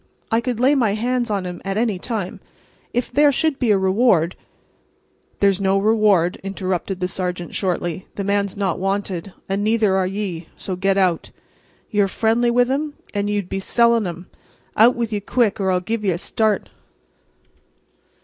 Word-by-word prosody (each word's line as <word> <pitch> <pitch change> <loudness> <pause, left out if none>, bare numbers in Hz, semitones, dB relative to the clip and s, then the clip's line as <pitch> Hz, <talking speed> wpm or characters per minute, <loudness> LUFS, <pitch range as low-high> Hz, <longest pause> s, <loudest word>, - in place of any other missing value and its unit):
I 225 +1 +3
could 240 -2 -3
lay 260 +4 +4
my 230 -8 +2
hands 245 +2 -1
on 200 -3 -1
him 180 -1 -6
at 195 +1 -2
any 220 -5 0
time. 205 -4 -4 0.5
If 245 +1 -2
there 290 +3 +5
should 285 +1 0
be 245 - +1
a 205 - +5
reward—" 190 -3 +2 1.1
"There's 200 -1 +3
no 195 0 +2
reward," 205 -4 +3
interrupted 190 -1 -3
the 180 - 0
sergeant, 180 -1 -4
shortly. 175 -2 -2
"The 200 - -3
man's 200 0 0
not 195 -4 -1
wanted. 195 -1 -2 0.2
And 195 +1 -1
neither 215 -2 +2
are 190 -1 +1
ye. 185 -4 -4
So, 185 - -4
get 195 +2 +1
out. 185 -4 +1 0.6
Ye 210 - +2
are 195 - +3
frindly 230 +4 +1
with 245 +1 +3
um, 295 +2 -2 0.2
and 205 0 -1
ye 210 - 0
would 200 -3 -3
be 195 - -2
selling 235 +1 +2
um. 175 +1 -7 0.5
Out 230 +4 +6
with 230 -2 -2
ye 205 - 0
quick, 215 +1 0
or 190 -1 +1
I'll 180 -1 +2
give 220 +4 -3
ye 200 - +1
a 170 - 0
start." 215 +3 0
200 Hz, 180 wpm, -21 LUFS, 190-230 Hz, 1.1 s, Out